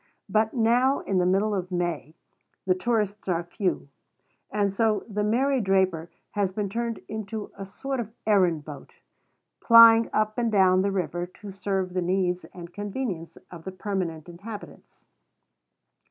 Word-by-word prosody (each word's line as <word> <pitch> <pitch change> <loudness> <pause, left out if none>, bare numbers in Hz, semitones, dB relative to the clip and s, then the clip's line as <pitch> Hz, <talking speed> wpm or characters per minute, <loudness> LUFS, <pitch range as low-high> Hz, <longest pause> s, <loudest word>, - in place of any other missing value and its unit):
But 220 +2 +1
now, 245 +4 +3
in 190 -2 0
the 180 - +2
middle 200 +3 +2
of 185 -2 -3
May, 175 -3 -2 0.5
the 185 - +4
tourists 210 0 -1
are 175 -2 0
few; 180 -2 -2 0.6
and 205 -2 0
so 215 0 +1
"The 210 -1 -2
Mary 255 +5 +2
Draper" 190 -4 +1 0.2
has 200 -2 0
been 200 +1 -3
turned 230 +2 -3
into 215 0 -5
a 195 - -7
sort 270 +7 -4
of 225 -2 -4
errand 180 -8 +2
boat, 150 -2 -10 0.7
plying 230 -1 +8
up 215 +1 0
and 235 -2 +1
down 185 -2 +4
the 200 - +1
river 175 -2 -2
to 200 +3 -11
serve 190 -1 -2
the 185 - 0
needs 180 -1 0
and 170 +1 -11
convenience 205 -5 -5
of 170 -2 -10
the 190 - -6
permanent 185 -5 -4
inhabitants. 200 +5 -11
195 Hz, 155 wpm, -26 LUFS, 180-220 Hz, 0.7 s, plying